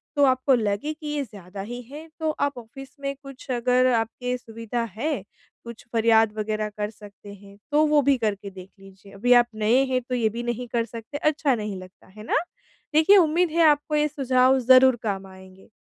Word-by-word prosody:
तो 285 - +3
आपको 260 +1 +2
लगे 215 +6 -2
कि 305 0 -10
ये 295 -1 -2
ज़्यादा 195 -4 -10
ही 245 0 -6
है, 290 +7 -11
तो 315 -1 -1
आप 285 -3 -2
ऑफिस 255 +3 -11
में 275 0 -4
कुछ 275 0 -12
अगर 250 +1 +2
आपके 245 +2 -2
सुविधा 230 0 -5
है, 260 -2 -2 0.4
कुछ 235 -1 -11
फरियाद 225 -1 +3
वग़ैरह 215 0 -2
कर 210 0 -2
सकते 205 -1 -13
हैं, 200 0 -16
तो 305 +1 +4
वो 295 -1 +4
भी 280 -1 +2
करके 205 -3 -3
देख 185 0 -12
लीजिए। 195 0 -16
अभी 245 +5 +3
आप 240 -1 +5
नए 225 +5 +3
हैं, 255 0 +1
तो 250 +1 -4
ये 230 -3 +1
भी 235 +3 -6
नहीं 240 +1 -4
कर 230 -1 +1
सकते, 230 +4 -8
अच्छा 300 -2 +1
नहीं 210 -3 -5
लगता, 185 0 -16
है 210 +3 -13
ना? - - +1 0.6
देखिए 320 +6 +6
उम्मीद 340 0 +3
है, 335 +1 +1
आपको 300 0 +2
ये 300 0 +2
सुझाव 265 -2 +2
ज़रूर 260 +1 +6
काम 195 -3 -3
आएँगे। 190 0 -16
240 Hz, 200 wpm, -24 LUFS, 215-275 Hz, 0.6 s, देखिए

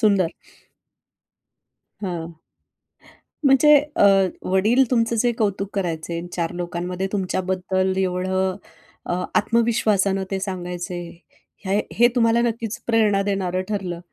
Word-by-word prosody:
सुंदर. 200 -6 +3 1.7
हं. 165 -3 -5 1.1
म्हणजे 275 +3 +6 0.2
अ, - - +3 0.5
वडील 215 +8 +4
तुमचं 230 -1 +2
जे 240 +1 +3
कौतुक 200 -3 -1
करायचे. 170 -3 -3
चार 170 -2 -2
लोकांमध्ये 175 +2 -3
तुमच्याबद्दल 185 -1 -1
एवढं 185 0 0 0.5
अ, 180 +1 -2
आत्मविश्वासानं 215 -4 +2
ते 195 - -1
सांगायचे. 180 -2 -4 0.7
हे 195 +2 +1 0.2
हे 240 +2 +6
तुम्हाला 230 0 +3
नक्कीच 230 -1 -2
प्रेरणा 215 -4 +3
देणारं 190 -2 -1
ठरलं. 185 -5 -3
190 Hz, 100 wpm, -22 LUFS, 180-220 Hz, 1.7 s, म्हणजे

